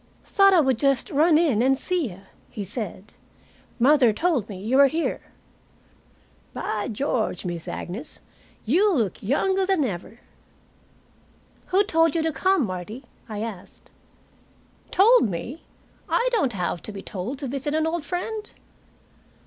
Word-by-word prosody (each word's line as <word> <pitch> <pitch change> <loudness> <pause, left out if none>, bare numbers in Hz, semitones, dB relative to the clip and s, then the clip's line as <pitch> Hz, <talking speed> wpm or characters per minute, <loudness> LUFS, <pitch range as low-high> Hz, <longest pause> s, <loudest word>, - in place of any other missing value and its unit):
"Thought 395 -2 +4
I 340 - +6
would 265 -5 +1
just 275 -3 +1
run 310 +2 +4
in 295 -10 +2
and 265 +2 +3
see 350 -4 -1
you," 185 +1 -12 0.3
he 210 - -6
said. 200 -1 -6 0.6
"Mother 255 -1 +5
told 275 - 0
me 195 -3 -7
you 225 +7 0
were 280 0 +8
here. 320 +5 -2 1.3
By 210 -1 -3
George, 225 -5 -2
Miss 170 -2 -5
Agnes, 215 - -5 0.5
you 370 - +3
look 225 - -1
younger 380 - +1
than 380 -5 +1
ever." 200 +2 -6 1.5
"Who 385 +2 +3
told 325 -5 +2
you 325 - +1
to 320 - 0
come, 360 +2 +2
Martie?" 195 +7 -6 0.3
I 210 0 -4
asked. 210 -6 -9 1.0
"Told 425 - +5
me? 230 - -6 0.5
I - - +2
don't 335 - +1
have 180 -2 -2
to - - -7
be 195 -1 -8
told 205 +8 -5
to 280 - -5
visit 280 +3 -3
an 315 0 +1
old 325 0 -2
friend." 420 +6 -4
270 Hz, 145 wpm, -24 LUFS, 210-335 Hz, 1.5 s, were